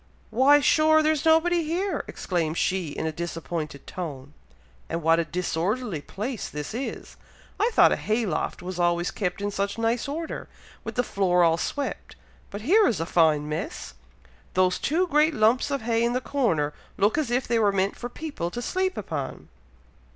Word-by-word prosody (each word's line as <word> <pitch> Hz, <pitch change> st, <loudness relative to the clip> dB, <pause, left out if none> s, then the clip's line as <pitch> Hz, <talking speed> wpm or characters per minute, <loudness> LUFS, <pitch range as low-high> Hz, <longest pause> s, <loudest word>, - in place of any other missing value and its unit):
"Why, 280 Hz, +5 st, +5 dB
sure! 315 Hz, +2 st, +4 dB
there's 310 Hz, 0 st, +1 dB
nobody 330 Hz, +2 st, +4 dB
here!" 345 Hz, +2 st, -1 dB
exclaimed 165 Hz, -3 st, -2 dB
she, 185 Hz, -3 st, 0 dB
in 145 Hz, -, -4 dB
a 160 Hz, -, 0 dB
disappointed 165 Hz, -3 st, -5 dB
tone. 145 Hz, -6 st, -7 dB, 0.6 s
"And 165 Hz, 0 st, -3 dB
what 165 Hz, +1 st, +4 dB
a 170 Hz, -, 0 dB
disorderly 180 Hz, -, -2 dB
place 220 Hz, -, -5 dB
this 150 Hz, +6 st, -6 dB
is! 255 Hz, +4 st, -5 dB, 0.4 s
I 450 Hz, -, +3 dB
thought -, -, +6 dB
a -, -, +3 dB
hay 220 Hz, +2 st, 0 dB
loft 175 Hz, -1 st, -2 dB
was 180 Hz, 0 st, -5 dB
always 175 Hz, 0 st, +1 dB
kept 185 Hz, -1 st, -3 dB
in 205 Hz, -, -1 dB
such 200 Hz, +1 st, -2 dB
nice 230 Hz, +2 st, 0 dB
order, 315 Hz, +3 st, -5 dB, 0.3 s
with -, -, -6 dB
the 245 Hz, -, +2 dB
floor 180 Hz, -5 st, +2 dB
all 165 Hz, -1 st, +4 dB
swept! 285 Hz, +7 st, -4 dB, 0.3 s
but 205 Hz, -, -7 dB
here 390 Hz, -, +5 dB
is 210 Hz, -, 0 dB
a 165 Hz, -, -1 dB
fine 155 Hz, -4 st, +3 dB
mess! 150 Hz, -, -5 dB, 0.6 s
Those 185 Hz, 0 st, +3 dB
two 335 Hz, +6 st, +1 dB
great 310 Hz, -2 st, +3 dB
lumps 225 Hz, +5 st, +3 dB
of 280 Hz, -4 st, -2 dB
hay 230 Hz, 0 st, +1 dB
in 235 Hz, +1 st, +1 dB
the 250 Hz, -, +1 dB
corner 185 Hz, -, 0 dB, 0.2 s
look 205 Hz, +2 st, +3 dB
as 305 Hz, -6 st, 0 dB
if 245 Hz, +2 st, 0 dB
they 235 Hz, -1 st, +2 dB
were 210 Hz, -2 st, +4 dB
meant 195 Hz, 0 st, 0 dB
for 245 Hz, -, -6 dB
people 265 Hz, -, -5 dB
to 235 Hz, -, -6 dB
sleep 375 Hz, +6 st, -1 dB
upon!" -, -, -5 dB
210 Hz, 180 wpm, -26 LUFS, 170-280 Hz, 0.6 s, thought